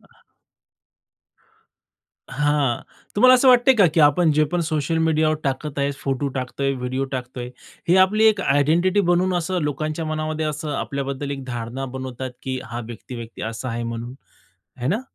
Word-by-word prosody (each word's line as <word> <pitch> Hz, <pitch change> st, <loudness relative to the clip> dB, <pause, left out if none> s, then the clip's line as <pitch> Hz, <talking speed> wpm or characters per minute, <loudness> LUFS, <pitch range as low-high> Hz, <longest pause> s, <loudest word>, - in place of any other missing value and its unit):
हां. -, -, -26 dB, 2.1 s
हां, 145 Hz, -4 st, +1 dB, 0.3 s
तुम्हाला 255 Hz, +4 st, +7 dB
असं 255 Hz, +1 st, +5 dB
वाटतंय 250 Hz, +1 st, +6 dB
का, 205 Hz, -6 st, +5 dB
की 160 Hz, 0 st, +1 dB
आपण 155 Hz, +3 st, +5 dB
जे 155 Hz, +1 st, +3 dB
पण 175 Hz, -, +1 dB
सोशल 160 Hz, 0 st, -1 dB
मीडियावर 155 Hz, -1 st, +2 dB
टाकत 140 Hz, +1 st, -2 dB
आहे, 140 Hz, 0 st, +1 dB
फोटो 135 Hz, +1 st, -1 dB
टाकतोय, 135 Hz, +2 st, -2 dB
व्हिडिओ 130 Hz, +1 st, -2 dB
टाकतोय, 125 Hz, -1 st, -5 dB, 0.4 s
ही 180 Hz, -, +5 dB
आपली 215 Hz, +3 st, +1 dB
एक 215 Hz, -2 st, +4 dB
आयडेंटिटी 170 Hz, +6 st, +3 dB
बनवून 180 Hz, +1 st, +2 dB
असं 180 Hz, +1 st, -2 dB
लोकांच्या 155 Hz, +2 st, -2 dB
मनामध्ये 155 Hz, 0 st, -2 dB
असं 150 Hz, 0 st, -4 dB
आपल्याबद्दल 140 Hz, 0 st, -3 dB
एक 135 Hz, -1 st, -5 dB
धारणा 120 Hz, +1 st, -5 dB
बनवतात, 130 Hz, 0 st, -5 dB
की 130 Hz, -1 st, -3 dB
हा 120 Hz, +2 st, -6 dB
व्यक्ती-व्यक्ती 115 Hz, 0 st, -8 dB
असा 115 Hz, +3 st, -4 dB
आहे 120 Hz, 0 st, -3 dB
म्हणून, 115 Hz, +1 st, -5 dB, 0.6 s
आहे 125 Hz, 0 st, -3 dB
ना? 205 Hz, +9 st, +1 dB
145 Hz, 155 wpm, -22 LUFS, 130-165 Hz, 2.1 s, तुम्हाला